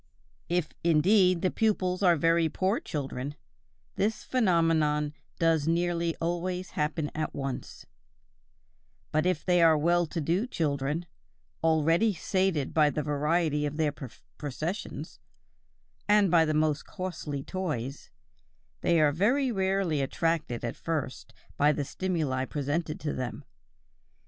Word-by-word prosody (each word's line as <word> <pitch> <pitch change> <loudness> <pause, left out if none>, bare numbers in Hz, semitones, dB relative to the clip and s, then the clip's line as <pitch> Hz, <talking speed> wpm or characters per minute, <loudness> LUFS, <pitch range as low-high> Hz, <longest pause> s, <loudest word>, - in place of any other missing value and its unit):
If, 175 -2 0
indeed, 180 +2 +4
the 185 - +2
pupils 185 -4 0
are 180 -3 +5
very 165 +1 +2
poor 190 +7 0
children, 140 -1 -5 0.6
this 215 +2 0
phenomenon 165 - +2 0.2
does 165 -2 +2
nearly 170 0 0
always 180 +2 -3
happen 150 0 -2
at 155 0 -3
once; 135 -2 -5 1.3
but 155 +3 +1
if 180 -4 -1
they 180 -1 +4
are 160 -2 +6
well 170 +2 +2
to 165 - -4
do 170 - 0
children, 150 - -1 0.6
already 165 +6 +3
sated 185 -5 0
by 155 -2 +4
the 150 +1 -2
variety 150 +1 +1
of 145 +1 -6
their 155 -2 +1 0.5
possessions, 155 - -5 0.9
and 205 -3 +4
by 165 -2 +5
the 155 -1 0
most 155 -1 +1
costly 165 -7 -5
toys, 145 -9 -4 0.7
they 170 -1 +2
are 150 -1 +4
very 245 - +2
rarely 190 -6 0
attracted 145 -3 -1
at 115 - -3
first 155 -5 -4 0.3
by 145 +1 +4
the 145 -1 -2
stimuli 155 -7 -1
presented 150 +4 -2
to 150 - -2
them. 125 -2 -5
165 Hz, 125 wpm, -28 LUFS, 150-180 Hz, 1.3 s, are